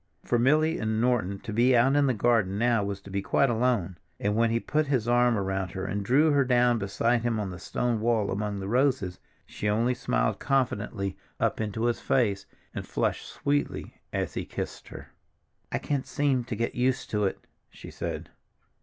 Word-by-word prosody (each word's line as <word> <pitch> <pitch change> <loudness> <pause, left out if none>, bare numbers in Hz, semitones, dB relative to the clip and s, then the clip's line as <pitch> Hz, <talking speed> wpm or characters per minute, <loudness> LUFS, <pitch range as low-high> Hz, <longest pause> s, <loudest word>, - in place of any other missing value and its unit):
For 120 - +1
Milly 155 +6 +3
and 110 0 -1
Norton 115 -5 +1
to 110 - -6
be 120 +3 +4
out 135 +4 +4
in 145 -1 +4
the 130 - +2
garden 105 -4 +2
now 115 -1 +2
was 100 -1 -3
to 100 - -12
be 100 0 -1
quite 135 +5 +2
alone, 115 -7 0 0.2
and 105 +1 0
when 115 +1 +3
he 115 +1 +1
put 150 +4 0
his 130 -5 0
arm 120 -1 +3
around 95 -2 -2
her 95 0 -4
and 100 +2 -2
drew 145 +9 +4
her 140 -1 +4
down 125 -2 +3
beside 115 +4 +1
him 115 -2 0
on 100 -3 -3
the 90 - -8
stone 115 +5 -1
wall 110 -2 +1
among 105 0 -2
the 95 - -5
roses, 125 -6 +1 0.3
she 105 - -3
only 115 +4 +2
smiled 120 -4 0
confidingly 105 -7 -1 0.2
up - - 0
into 110 +1 -3
his 120 0 +1
face, 105 -7 +1 0.3
and - - -6
flushed - - -1
sweetly 145 0 -2
as - - -2
he - - -3
kissed - - -6
her. - - -10 0.6
"I - - 0
can't 140 -3 -2
seem 140 -4 +1
to 120 - -4
get 115 +2 -2
used 125 +1 0
to 105 -1 +1
it," 95 - -3 0.2
she - - -11
said. - - -5
115 Hz, 200 wpm, -27 LUFS, 100-125 Hz, 0.6 s, be